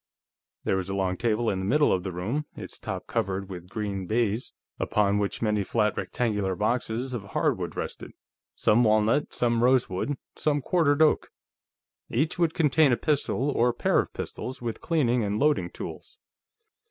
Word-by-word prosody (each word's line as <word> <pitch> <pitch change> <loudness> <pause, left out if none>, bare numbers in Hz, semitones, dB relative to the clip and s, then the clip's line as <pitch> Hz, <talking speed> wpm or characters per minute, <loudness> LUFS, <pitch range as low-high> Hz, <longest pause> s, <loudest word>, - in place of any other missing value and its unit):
There 95 - +1
was 95 0 -3
a 95 - -2
long 95 -1 0
table 115 +1 0
in 95 -3 +1
the 95 - -3
middle 145 +8 +3
of 90 - +1
the 95 +1 -4
room, 110 - -3
its - - -8
top - - -5
covered 95 0 -2
with 90 -1 -8
green 100 -2 -3
baize, 115 +1 0 0.3
upon 105 -1 +2
which 100 +2 -2
many 105 -2 +1
flat 105 +2 +1
rectangular 105 -6 -1
boxes 120 +4 -1
of 115 -5 -3
hardwood 100 - -1
rested - - -6 0.4
some 115 +3 +3
walnut, 110 +5 +3
some 120 -1 +1
rosewood, 125 0 +2 0.2
some 150 -1 +1
quartered 150 0 +3
oak. 155 - +2 0.8
Each 150 +8 0
would 165 -2 +2
contain 150 -2 +4
a 120 - +3
pistol 145 -2 0
or 120 -2 +2
pair - - +2
of - - -1
pistols, 130 - -6
with 115 -2 -4
cleaning 125 -8 +1
and 105 0 -1
loading 145 -10 +2
tools. - - -8
115 Hz, 165 wpm, -27 LUFS, 100-135 Hz, 0.8 s, contain